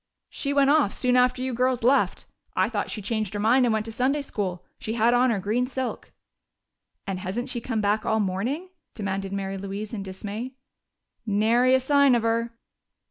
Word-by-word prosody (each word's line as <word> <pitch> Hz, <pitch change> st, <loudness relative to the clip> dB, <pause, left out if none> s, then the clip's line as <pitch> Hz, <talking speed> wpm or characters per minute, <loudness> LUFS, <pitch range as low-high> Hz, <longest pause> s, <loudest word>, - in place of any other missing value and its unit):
"She 280 Hz, -, -3 dB
went 280 Hz, 0 st, +4 dB
off 295 Hz, -9 st, +3 dB
soon 250 Hz, -1 st, +2 dB
after 250 Hz, 0 st, +3 dB
you 260 Hz, -1 st, -2 dB
girls 250 Hz, 0 st, +1 dB
left. 265 Hz, +4 st, +2 dB, 0.3 s
I -, -, +2 dB
thought -, -, -2 dB
she 210 Hz, -, -5 dB
changed 215 Hz, -1 st, -2 dB
her -, -, -2 dB
mind 245 Hz, +4 st, +4 dB
and 230 Hz, -, +2 dB
went 215 Hz, -1 st, -1 dB
to 225 Hz, -, -6 dB
Sunday 270 Hz, +5 st, 0 dB
school. 185 Hz, -8 st, -4 dB
She 220 Hz, -, -4 dB
had 235 Hz, +1 st, +3 dB
on 250 Hz, +1 st, +4 dB
her 225 Hz, -, +1 dB
green 220 Hz, +6 st, 0 dB
silk." 260 Hz, -1 st, -4 dB, 0.9 s
"And 195 Hz, -2 st, -3 dB
hasn't 235 Hz, +8 st, -4 dB
she 245 Hz, -2 st, -3 dB
come 225 Hz, -2 st, -2 dB
back 210 Hz, +1 st, +1 dB
all 220 Hz, -, +1 dB
morning?" 225 Hz, -, -2 dB, 0.3 s
demanded 195 Hz, -2 st, -3 dB
Mary 195 Hz, -1 st, -3 dB
Louise 200 Hz, +2 st, -6 dB
in 210 Hz, -, -3 dB
dismay. 205 Hz, +6 st, -6 dB, 0.7 s
"Nary 230 Hz, +5 st, +3 dB
a -, -, +4 dB
sign 280 Hz, 0 st, +4 dB
of 235 Hz, -, 0 dB
her." 230 Hz, +1 st, 0 dB
230 Hz, 190 wpm, -25 LUFS, 205-255 Hz, 0.9 s, went